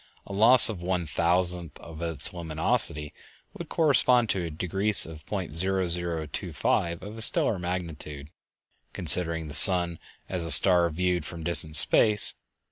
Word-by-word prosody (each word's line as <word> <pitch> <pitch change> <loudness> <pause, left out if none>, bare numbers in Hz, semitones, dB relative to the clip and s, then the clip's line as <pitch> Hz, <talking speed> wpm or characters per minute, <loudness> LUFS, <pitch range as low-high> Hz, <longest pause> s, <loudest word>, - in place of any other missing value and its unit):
A - - -11
loss 115 +5 +8
of 105 -6 -4
one 90 -1 -4
thousandth 85 0 -1
of 80 -1 -13
its 80 -2 -3
luminosity 80 -1 -3 0.4
would - - -11
correspond 125 -7 0
to 95 - -4
a - - -7
decrease 95 +6 -1
of 80 -1 -13
.0025 85 -2 -4
of 105 +3 -11
a - - -7
stellar 110 -2 0
magnitude, 80 -5 -8 0.6
considering 80 -1 +3
the 75 - -11
sun 85 0 +2 0.3
as 90 -3 -4
a 85 - -5
star 85 +2 +5
viewed 90 +1 -4
from 85 +1 -11
distant 80 -2 0
space. 105 - +2
85 Hz, 135 wpm, -24 LUFS, 80-95 Hz, 0.6 s, loss